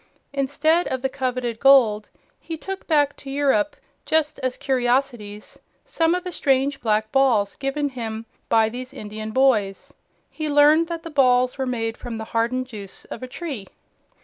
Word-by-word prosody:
Instead 290 +5 +1
of 260 0 -3
the 265 - +1
coveted 255 -4 -3
gold, 235 -7 +5 0.3
he 325 - -6
took 385 +4 -7
back 290 -3 +2
to 275 - -10
Europe, 285 +2 +1 0.3
just 315 -1 0
as 255 -1 -2
curiosities, 245 -5 -1 0.3
some 330 +1 +1
of 360 - -3
the 365 - -5
strange 275 -2 +1
black 215 -1 0
balls 245 -7 +2
given 285 +1 -1
him 225 -3 -5 0.2
by 225 -1 +4
these 255 +4 -7
Indian 215 -1 -6
boys. 215 -5 +1 0.4
He 310 -1 -4
learned 295 +3 +5
that 335 -1 -5
the 330 - -8
balls 255 -2 +3
were 265 - -1
made 225 -2 -2
from 235 -2 -6
the 220 - -5
hardened 240 +3 0
juice 205 -6 -10
of - - -9
a 255 - -5
tree. 260 - -6
260 Hz, 165 wpm, -23 LUFS, 225-290 Hz, 0.4 s, gold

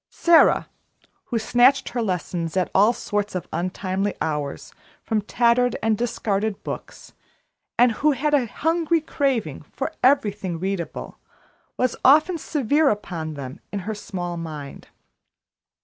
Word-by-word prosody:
Sara, 340 -1 +4 0.6
who 235 - -2
snatched 245 +4 +3
her 245 - -2
lessons 180 -4 -2
at 185 - 0
all 205 +4 +5
sorts 205 -4 -3
of 180 - -4
untimely 185 +3 -2
hours 150 -3 -3 0.3
from 220 -2 0
tattered 240 +3 +2
and 220 -1 +3
discarded 215 -3 -2
books, - - -8 0.6
and 245 0 +5
who 295 +7 +2
had 295 +3 -1
a 265 -5 +3
hungry 330 +6 +1
craving 265 - -1
for 270 - -5
everything 205 -9 +2
readable, 190 -2 -4 0.6
was 255 -1 +1
often 310 +6 +5
severe 290 +1 +2
upon 170 -7 -3
them 140 +3 -7
in 200 - -3
her 220 - -2
small 175 -4 -5
mind. 155 -4 -7
215 Hz, 130 wpm, -23 LUFS, 180-260 Hz, 0.6 s, all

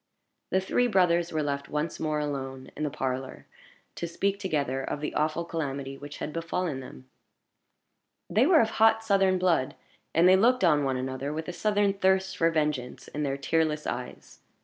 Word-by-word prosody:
The 190 - +2
three 245 +6 +1
brothers 175 -5 +2
were 155 -1 -1
left 140 -1 -3
once 150 +2 -2
more 155 -1 -1
alone 135 -3 -4
in - - -7
the 150 - 0
parlor, 130 -1 -4 0.5
to 170 - -4
speak 195 +4 -1
together 140 -8 -1
of 145 - -3
the 150 - -4
awful 155 +2 0
calamity 140 -5 -4
which 145 +1 -9
had 150 - -5
befallen 165 -3 -2
them. 65 - -11 1.2
They 235 +7 +3
were 330 -3 +6
of 220 - 0
hot 225 0 +4
Southern 195 -3 +3
blood, 170 -8 +1 0.4
and 170 +3 +6
they 185 - +7
looked 235 +4 +3
on 150 -4 +4
one 135 -2 0
another 130 +2 -3
with 160 +1 -4
a - - -4
Southern 205 +1 +1
thirst 190 -1 +1
for 165 - +3
vengeance 150 -6 -2
in 150 - -5
their 140 -2 -1
tearless 155 +1 0
eyes. 125 0 -6
155 Hz, 180 wpm, -28 LUFS, 140-190 Hz, 1.2 s, they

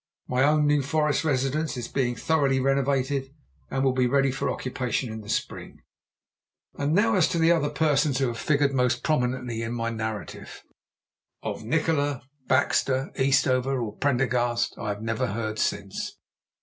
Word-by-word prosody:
My 125 +1 0
own 150 +2 +4
New 145 0 +3
Forest 150 +2 +1
residence 145 +1 0
is 120 - -4
being 120 -3 -1
thoroughly 140 +1 +1
renovated, 135 0 0 0.4
and 135 0 -1
will 135 -1 +3
be 130 -1 +2
ready 135 +1 +2
for 130 - -2
occupation 125 -1 -2
in 110 - -6
the 105 - -12
spring. - - -4 0.9
And 145 +3 -1
now 225 +3 +3
as 185 -5 +4
to 175 - -2
the 165 +1 +4
other 155 -4 +2
persons 150 -4 +1
who 135 - +1
have 115 - -5
figured 145 -2 +2
most 125 -1 +1
prominently 125 -6 -1
in 115 +1 -3
my 115 -1 -2
narrative. 110 -2 -6 0.8
Of - - -4
Nikola, 145 +1 0 0.2
Baxter, 130 0 +1
Eastover, 130 -1 +2
or 110 -3 -4
Prendergast 125 -3 +1
I 105 - -5
have 105 +1 -4
never 115 +3 -1
heard 110 0 -3
since. 100 -1 -2
135 Hz, 160 wpm, -26 LUFS, 120-145 Hz, 0.9 s, own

